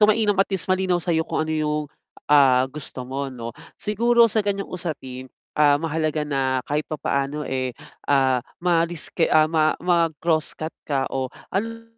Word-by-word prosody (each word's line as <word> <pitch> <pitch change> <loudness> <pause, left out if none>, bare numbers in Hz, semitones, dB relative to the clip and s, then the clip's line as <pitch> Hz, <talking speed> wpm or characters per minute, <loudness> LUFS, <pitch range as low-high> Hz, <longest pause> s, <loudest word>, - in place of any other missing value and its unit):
So - - +8
mainam 215 -1 +3
at 195 - +2
least 190 - -1
malinaw 185 -1 +2
sa'yo 165 -2 0
kung 155 - -1
ano 160 - -3
yung, 150 -1 0 0.5
ah, 135 -3 +6
gusto 135 -2 -7
mo 135 +2 -3
'no, 115 -2 -6 0.3
siguro 235 +3 +4
sa 215 0 0
ganiyang 200 -1 -2
usapin, 135 -7 -6 0.3
ah, 145 -1 +5
mahalaga 155 -1 -1
na 135 -3 0
kahit 150 +1 0
papaano, 145 -1 -2
eh, 130 -1 -1 0.4
ah, 130 -3 +3 0.2
maalis 170 -1 +1
kay - - +2 0.2
ma 155 -1 +3
mag-crosscut 165 -2 0
ka 135 -3 -1
o 130 -1 -1 0.2
ano 230 +3 -2
155 Hz, 155 wpm, -23 LUFS, 135-180 Hz, 0.5 s, So